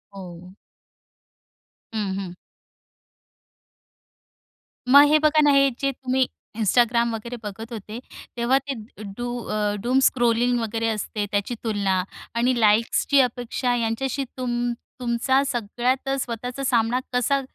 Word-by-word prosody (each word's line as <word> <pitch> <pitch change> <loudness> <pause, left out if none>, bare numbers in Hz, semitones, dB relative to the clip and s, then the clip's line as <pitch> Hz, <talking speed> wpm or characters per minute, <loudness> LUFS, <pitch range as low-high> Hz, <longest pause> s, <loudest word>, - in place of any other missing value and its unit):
हो. 180 -1 -10 1.4
हं, 205 -3 -2
हं. 185 -3 -6 2.6
मग 285 +2 +9
हे 310 - +6
बघा 305 0 +4
ना, 295 -1 +5
हे 275 0 +5
जे 275 0 +1
तुम्ही 260 -1 0 0.3
Instagram 235 +2 +3
वगैरे 235 +2 -6
बघत 220 +3 -7
होते, 220 +1 -7 0.4
तेव्हा 240 +3 +3
ते 275 +1 -5 0.4
डू 245 0 -3 0.2
अ, 210 -1 -1
डूमस्क्रॉलिंग 245 -1 +2
वगैरे 225 0 -2
असते 210 -1 -3
त्याची 205 +4 -1
तुलना 200 -4 0 0.3
आणि 245 +2 +2
लाइक्सची 225 +6 +3
अपेक्षा 245 0 -1
यांच्याशी 245 +4 -1
तुम 240 -1 -1 0.3
तुमचा 250 +3 +1
सगळ्यात 250 +2 -1
स्वतःचा 245 +3 -5
सामना 240 -1 +2
कसा 260 +3 +2
240 Hz, 115 wpm, -23 LUFS, 220-255 Hz, 2.6 s, मग